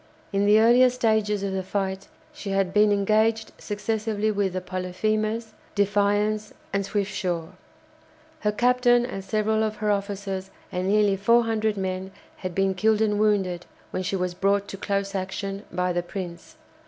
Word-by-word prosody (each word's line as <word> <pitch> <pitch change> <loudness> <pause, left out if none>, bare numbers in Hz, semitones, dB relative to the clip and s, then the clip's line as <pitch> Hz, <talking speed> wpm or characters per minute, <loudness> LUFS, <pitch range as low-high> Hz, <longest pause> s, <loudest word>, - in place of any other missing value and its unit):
In 200 +1 +2
the 210 +1 +6
earlier 240 +3 +6
stages 220 -4 +1
of 195 -1 -2
the 190 - -1
fight 190 0 -3 0.3
she 200 - -7
had 195 -1 0
been 210 0 +5
engaged 220 +2 +2
successively 215 0 -1
with 200 -3 0
the 185 - -1
"Polyphemus," 215 +5 -2 0.2
"Defiance," 205 +1 +1 0.2
and 200 0 +1
"Swiftsure." 190 -4 -2 0.9
Her 210 - +1
captain 245 +1 +3
and 195 -6 -5
several 215 +2 +1
of 215 -1 0
her 210 -1 0
officers 195 -1 -3 0.2
and 180 +1 -2
nearly 205 0 +3
400 220 0 +2
men 190 0 -3 0.3
had 185 -2 -5
been 195 0 +2
killed 215 +3 +2
and 210 -2 +1
wounded 190 -5 +1 0.2
when - - -2
she 185 +1 -2
was 180 -1 -1
brought 200 +2 +1
to - - -5
close 200 0 -2
action 195 +1 -4
by 180 0 0
the 175 - 0
"Prince." 175 -1 -7
200 Hz, 155 wpm, -25 LUFS, 190-215 Hz, 0.9 s, the